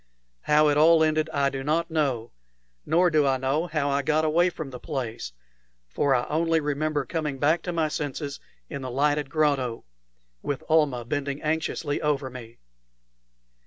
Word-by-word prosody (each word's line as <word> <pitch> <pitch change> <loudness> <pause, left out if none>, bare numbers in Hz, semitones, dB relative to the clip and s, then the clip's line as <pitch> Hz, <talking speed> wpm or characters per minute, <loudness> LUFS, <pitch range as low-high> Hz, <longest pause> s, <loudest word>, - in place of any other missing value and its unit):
How 150 0 +4
it 145 - +2
all 160 +1 +6
ended 155 0 +1
I 140 -2 +1
do 135 -1 -5
not 165 +3 0
know, 135 -8 -1 0.6
nor 175 +2 +3
do 150 -2 +3
I 135 -1 +2
know 135 +6 0
how 150 -3 -1
I 140 +1 +1
got 155 +3 +1
away 170 +3 +3
from 155 -5 -7
the 125 - -8
place; 120 - -5 0.6
for 135 - +1
I 125 - 0
only 165 +1 +1
remember 150 -1 -1
coming 150 0 -3
back 155 +5 +2
to 180 - -4
my 165 -2 +1
senses 145 -1 -4 0.3
in 140 -3 -6
the 130 - -5
lighted 145 +2 0
grotto, 140 -6 0 0.6
with 140 - -3
Almah 150 -7 +2
bending 140 +2 -3
anxiously 155 -1 -1
over 140 -3 -1
me. 120 -2 -10
150 Hz, 165 wpm, -26 LUFS, 135-155 Hz, 0.6 s, all